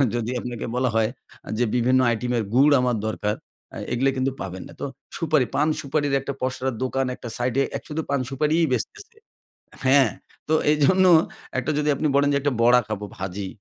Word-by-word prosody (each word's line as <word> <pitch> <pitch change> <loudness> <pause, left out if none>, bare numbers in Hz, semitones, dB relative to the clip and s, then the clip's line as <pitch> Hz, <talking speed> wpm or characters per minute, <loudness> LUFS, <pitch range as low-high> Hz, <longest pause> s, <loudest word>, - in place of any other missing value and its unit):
যদি 120 +1 -2
আপনাকে 120 -1 -5
বলা 125 0 +1
হয় 110 0 +3 0.4
আ - - -8
যে, 120 - +2
বিভিন্ন 130 +2 +3
আইটেমের 120 0 0
গুড় 140 +3 +6
আমার 125 -3 +1
দরকার, 105 -1 -1 0.4
আ - - -6 0.2
এগুলো 135 +3 +2
কিন্তু 130 +1 +1
পাবেন 95 -1 -6
না। - - -13
তো - - -1 0.3
সুপারি, 155 -5 +2
পান 150 +2 +3
সুপারির 145 0 -1
একটা 140 - -4
পসরার 130 -1 -2
দোকান 135 +1 0
একটা 120 - -8
সাইড 120 0 -1
এ - - 0 0.2
শুধু 155 +1 -3
পান 140 -1 +1
সুপারিই 155 +4 +2
বেচতেছে। 415 - -4 0.7
হ্যাঁ, 135 -3 +5 0.4
তো 155 - +1 0.2
এইজন্য 185 +6 +4 0.5
একটা 155 - -1
যদি 150 0 +1
আপনি 155 - 0
বলেন 145 0 +4
যে, - - +3
একটা 145 -2 0 0.3
খাবো 105 -1 -4
ভাজি, 95 +1 -4
130 Hz, 180 wpm, -24 LUFS, 120-145 Hz, 0.7 s, গুড়